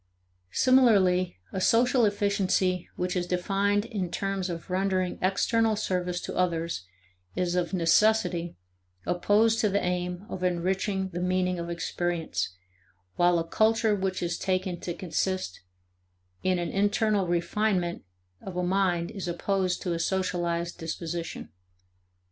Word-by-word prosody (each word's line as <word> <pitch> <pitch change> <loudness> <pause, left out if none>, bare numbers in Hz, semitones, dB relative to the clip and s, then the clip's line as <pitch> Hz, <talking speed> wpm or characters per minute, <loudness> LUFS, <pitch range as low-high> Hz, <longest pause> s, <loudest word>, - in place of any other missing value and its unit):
Similarly 195 - +4 0.2
a 190 - -2
social 245 +3 +4
efficiency 200 -3 +1
which 180 +1 -2
is 175 -1 -1
defined 200 +3 +1
in 205 -6 -3
terms 195 0 -2
of 170 +1 -6
rendering 185 -1 0
external 220 +4 +2
service 180 -4 -1
to - - -6
others 170 - -1 0.5
is 175 -1 0
of 180 -1 0
necessity 180 -1 +2 0.5
opposed 215 +5 +3
to 210 - +3
the 200 +1 +1
aim 180 +1 -2
of 185 - -6
enriching 190 +2 0
the 175 - -5
meaning 180 0 0
of 170 0 -4
experience, 170 - -2 0.6
while 175 0 +4
a 165 0 -2
culture 220 +3 +3
which 190 -2 -1
is 175 0 -2
taken 185 -2 -1
to 175 - -4
consist 185 - -2 0.8
in 185 -1 +1
an 175 -1 -2
internal 205 0 +1
refinement 175 +1 0 0.4
of 185 -2 -7
a 180 - 0
mind 180 -2 +1
is 190 -3 -5
opposed 185 +1 -1
to 175 - -1
a 165 - -2
socialized 175 -1 -1
disposition. 165 0 -5
185 Hz, 130 wpm, -27 LUFS, 175-200 Hz, 0.8 s, Similarly